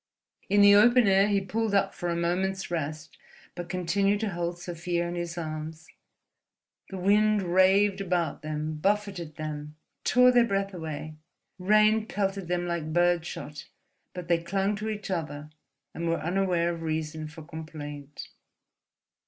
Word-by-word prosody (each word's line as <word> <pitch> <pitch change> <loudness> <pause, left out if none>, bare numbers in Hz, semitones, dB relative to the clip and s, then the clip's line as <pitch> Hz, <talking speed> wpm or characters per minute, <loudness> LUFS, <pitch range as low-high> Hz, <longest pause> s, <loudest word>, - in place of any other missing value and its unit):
In 205 +1 +4
the 200 0 +8
open 240 +3 +6
air 195 +1 +5
he 205 -1 +2
pulled 210 +2 -1
up 195 0 +2
for 175 - -4
a 170 - 0
moment's 185 +3 -1
rest, 155 -1 -4 0.3
but 175 -1 -7
continued 195 +3 +1
to 220 - -1
hold 175 0 -3
Sofia 175 0 -3
in 170 - -4
his 175 -1 -4
arms. 155 0 -6 1.0
The 195 - -6
wind 210 +2 +3
raved 190 +2 +3
about 175 -5 -1
them, 155 0 -4
buffeted 190 -3 -1
them, 150 -1 -6 0.3
tore 250 0 +5
their 245 -1 +5
breath 195 -1 -1
away, 155 -2 -6 0.4
rain 215 +3 +3
pelted 195 -3 -2
them 175 0 -1
like 170 -3 -3
birdshot; 175 -3 -1 0.5
but 180 -2 -6
they 170 -1 +3
clung 195 +4 0
to 215 +1 -4
each 210 -2 -5
other 150 -4 -4 0.4
and 170 0 -3
were 165 - 0
unaware 175 -1 0
of 165 - -7
reason 155 -1 -3
for 160 +1 -11
complaint. 150 -3 -8
175 Hz, 150 wpm, -27 LUFS, 160-195 Hz, 1.0 s, the